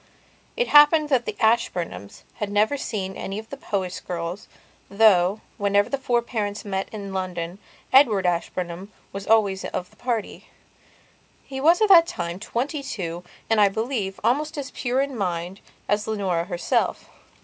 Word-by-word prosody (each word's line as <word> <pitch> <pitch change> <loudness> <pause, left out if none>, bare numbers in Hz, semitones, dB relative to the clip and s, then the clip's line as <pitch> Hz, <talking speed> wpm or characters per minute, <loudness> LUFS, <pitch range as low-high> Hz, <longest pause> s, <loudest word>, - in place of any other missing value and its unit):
It 485 - 0
happened 295 +1 +6
that 255 -4 +2
the - - -4
Ashburnhams 185 - 0
had 210 -1 -3
never 210 +7 +2
seen 195 -8 -4
any 195 - -5
of 220 +1 -8
the - - -4
Powys 190 -7 -3
girls, 175 +2 -5 0.4
though, 200 -1 +4 0.2
whenever 200 0 +2
the 275 - -2
four 240 -3 +1
parents 210 -4 -3
met 195 -1 -3
in 200 -3 -7
London, 180 -1 -4 0.3
Edward 225 -8 +5
Ashburnham 175 +2 -2 0.2
was 195 0 -6
always 205 -4 +3
of 180 +2 -5
the - - -22
party. 230 -2 -4 1.0
He 265 -1 -6
was 335 +7 +5
at 425 - +3
that 335 -3 +8
time 170 - -4
twenty 265 +8 -3
two 175 -10 -5 0.2
and, 225 -2 +3
I 200 - +6
believe, 220 -2 -3
almost 295 +7 0
as 280 -2 -5
pure 255 0 -1
in 275 -1 -3
mind 180 -2 -3 0.3
as 210 +1 0
Leonora 190 -6 -1
herself. 175 -2 -1
205 Hz, 160 wpm, -24 LUFS, 185-245 Hz, 1.0 s, that